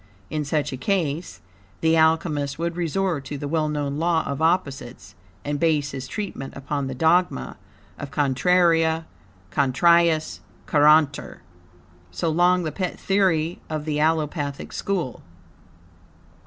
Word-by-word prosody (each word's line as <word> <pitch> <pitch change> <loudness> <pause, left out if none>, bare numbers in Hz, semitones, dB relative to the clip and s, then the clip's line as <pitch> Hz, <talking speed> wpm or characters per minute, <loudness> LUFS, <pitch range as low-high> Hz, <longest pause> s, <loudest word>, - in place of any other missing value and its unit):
In 155 -1 -1
such 150 -1 -1
a - - -4
case, 160 +1 -2 0.4
the 160 0 +3
Alchemist 160 -3 +1
would 170 +1 -2
resort 175 -2 -1
to 145 - -5
the 145 - -5
well 155 0 0
known 145 -1 -2
law 165 -1 +2
of 140 +2 -4
opposites, 150 -7 -1 0.3
and 145 0 -2
base 150 -4 +1
his 130 -1 -6
treatment 195 -9 -6
upon 140 0 -3
the 130 - -5
dogma 160 - +1 0.4
of 140 - -6
"Contraria 160 +3 +2 0.5
contrariis 160 +4 +3 0.3
curantur," 150 -1 +3 0.7
so 90 - -2
long 175 +2 +3
the 155 - -2
pet 185 +3 -4
theory 180 -4 +1
of 155 -1 -3
the 150 -1 -1
Allopathic 150 -2 -1
school. 175 -11 -3
155 Hz, 130 wpm, -23 LUFS, 140-170 Hz, 0.7 s, the